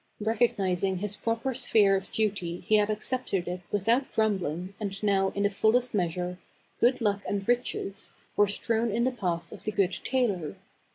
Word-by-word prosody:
Recognizing 195 -4 +1
his 205 +2 -3
proper 230 +4 -1
sphere 220 -5 +3
of 190 0 -4
duty 195 -5 -1
he 215 +4 +3
had 210 0 +2
ac 215 0 -2
cepted 210 -9 -1
it 180 0 -4
without 225 +7 +1
grumbling 190 -4 0
and 200 -2 -3
now 195 -2 +3
in 200 - 0
the 205 - +3
full 220 +4 +3
est 250 0 -2
measure, 180 -1 -1 0.4
"Good 250 +2 +3
Luck 200 -2 +1
and 200 -1 -2
Riches" 240 -4 0 0.2
were 205 - +5
strewn 225 +3 0
in 230 +3 0
the 260 - +2
path 175 -8 -3
of - - -10
the 215 - -2
good 195 -2 +2
tailor. 205 - 0
205 Hz, 180 wpm, -28 LUFS, 190-225 Hz, 0.4 s, were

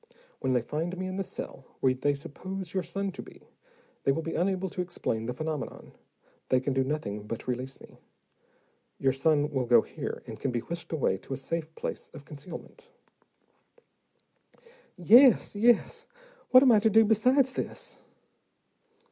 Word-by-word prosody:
When 130 - 0
they 125 -2 +1
find 165 +7 -3
me 185 - -3
in 185 0 -4
the 195 - -1
cell 135 - -7 0.2
where 130 -1 +3
they 145 +3 0
suppose 185 +5 -7
your 190 - +1
son 195 +3 -3
to - - -8
be, - - -15 0.6
they 135 - +2
will 160 +4 -2
be 165 - -4
unable 190 +1 0
to 180 - -4
explain 115 -10 -3
the 125 - -2
phenomenon; 155 -1 -5 0.6
they 130 - +4
can 130 +1 -2
do 135 0 +2
nothing 105 -8 -4
but 115 - -6
release 130 +2 -3
me. - - -16 1.0
Your 135 -1 +2
son 150 +1 +2
will 130 -4 -1
go 120 - +6
here, - - -6
and - - -9
can 135 - -1
be 120 -2 -1
whisked 170 +7 -6
away 135 - +1
to 135 - -8
a - - -7
safe 160 +3 -4
place - - -5
of 140 - -11
concealment." 170 - -11 2.1
"Yes, 230 +7 +6
yes. 230 +2 +2 0.4
What 255 +1 +8
am 260 - +6
I 215 - +6
to 220 +1 +3
do 220 +1 +6
besides 250 +5 +3
this?" - - -6
160 Hz, 170 wpm, -28 LUFS, 135-195 Hz, 2.1 s, What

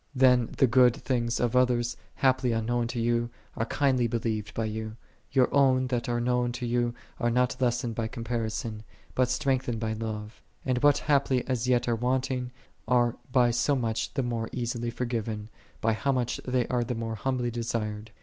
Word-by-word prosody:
When 125 -2 +5
the - - +6
good 125 0 +5
things 120 -4 -1
of 120 0 0
others, 120 -1 +2 0.2
haply 130 -2 +2
unknown 115 +1 0
to 120 0 -4
you, 120 0 +1 0.3
are 115 - -1
kindly 130 -4 +2
believed 110 -2 -2
by 115 - 0
you, 110 0 -4 0.4
your 130 -1 +3
own 130 -2 +4
that 120 -1 -1
are 120 0 +1
known 125 0 +1
to 125 0 -4
you 120 0 0 0.2
are 120 - +2
not 125 +1 +1
lessened 120 -1 +1
by 110 0 -2
comparison, 115 -2 -3 0.3
but 125 -1 +2
strengthened 125 -3 0
by 110 -1 -1
love: 110 0 -5 0.2
and 125 -2 0
what 145 -1 +5
haply 140 -3 +2
as 125 -2 -1
yet 125 -1 +2
are 120 - +2
wanting, 125 +1 -1 0.4
are 120 -1 +3 0.2
by 125 -2 +4
so 140 +4 +2
much 115 -3 -2
the 135 - +1
more 115 -2 -2
easily 120 -1 -2
given, 115 -3 -3 0.3
by 115 0 +2
how 140 +5 0
much 125 -3 -1
they 125 -1 +1
are 125 -1 +1
the 120 +1 -3
more 115 0 -3
humbly 125 +2 -1
desired. 110 -2 -3
120 Hz, 180 wpm, -28 LUFS, 115-125 Hz, 0.4 s, the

